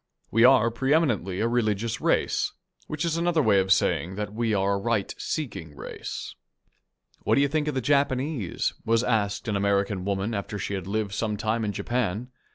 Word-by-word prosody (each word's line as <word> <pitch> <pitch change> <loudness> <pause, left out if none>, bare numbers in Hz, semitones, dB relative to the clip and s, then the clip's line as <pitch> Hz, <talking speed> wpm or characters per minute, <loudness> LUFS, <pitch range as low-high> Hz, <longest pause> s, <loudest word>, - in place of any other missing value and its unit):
We 115 +2 +4
are 120 -3 +6
pre 135 +5 +2
eminently 105 - +1
a 115 - +2
religious 115 -2 0
race, - - +1 0.3
which 155 +2 -3
is 165 -1 0
another 170 -2 +2
way 100 -4 +4
of 95 0 0
saying 95 0 +2
that 105 0 -4
we 115 0 0
are 100 -1 +2
a - - +1
right 110 -1 -1
seeking 95 - -4
race. - - -6 0.9
"What - - +1
do 140 - +4
you 140 - +4
think 150 +1 -1
of 150 - -1
the 130 - 0
Japanese?" 140 - 0
was 115 +1 +2
asked 110 -2 0
an 105 - 0
American 100 -1 +1
woman 100 +3 -1
after 100 0 -3
she 100 - -3
had 95 -2 -4
lived 105 0 -2
some 105 -1 -1
time 110 +2 -1
in 105 - -1
Japan. 120 +1 -2
110 Hz, 190 wpm, -26 LUFS, 100-125 Hz, 0.9 s, are